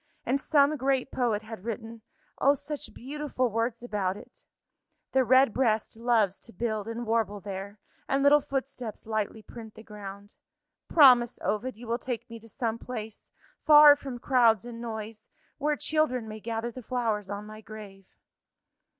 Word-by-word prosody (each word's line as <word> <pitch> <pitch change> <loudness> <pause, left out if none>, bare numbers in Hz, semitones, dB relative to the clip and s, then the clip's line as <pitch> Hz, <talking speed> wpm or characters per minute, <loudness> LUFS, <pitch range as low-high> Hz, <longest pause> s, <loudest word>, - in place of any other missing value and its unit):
And 270 +3 0
some 290 0 +3
great 265 -1 0
poet 230 -4 0
had 220 -3 -9
written 225 0 -6 0.4
oh, 280 +1 +4
such 295 +1 -6
beautiful 270 -2 -3
words 230 +2 -2
about 200 -5 -2
it. - - -15 0.7
The 265 - +3
red 260 -1 +5
breast 225 -5 0
loves 225 -4 +1
to 230 - -12
build 220 -3 -3
and 230 +1 -4
warble 220 -2 0
there, 200 +1 -7 0.3
And 275 0 +1
little 290 +1 +6
footsteps 265 -5 -5
lightly 215 0 -3
print 220 -1 -11
the 220 - -12
ground. 205 -1 -10 0.5
Promise, 250 -6 +6
Ovid, 220 +3 -2
you 240 - -10
will 235 +1 -1
take 245 -1 -5
me 230 - -8
to 225 +1 -16
some 230 0 -3
place, 220 -4 -8 0.3
far 295 -1 +9
from 270 -3 -7
crowds 235 -4 +3
and 235 -1 -8
noise 220 -2 -7 0.3
where 300 +1 +1
children 290 -7 0
may 215 0 -7
gather 230 +2 -3
the 255 - -9
flowers 225 -5 -2
on 205 +1 -5
my 215 0 -10
grave." 205 -3 -11
230 Hz, 160 wpm, -28 LUFS, 215-255 Hz, 0.7 s, far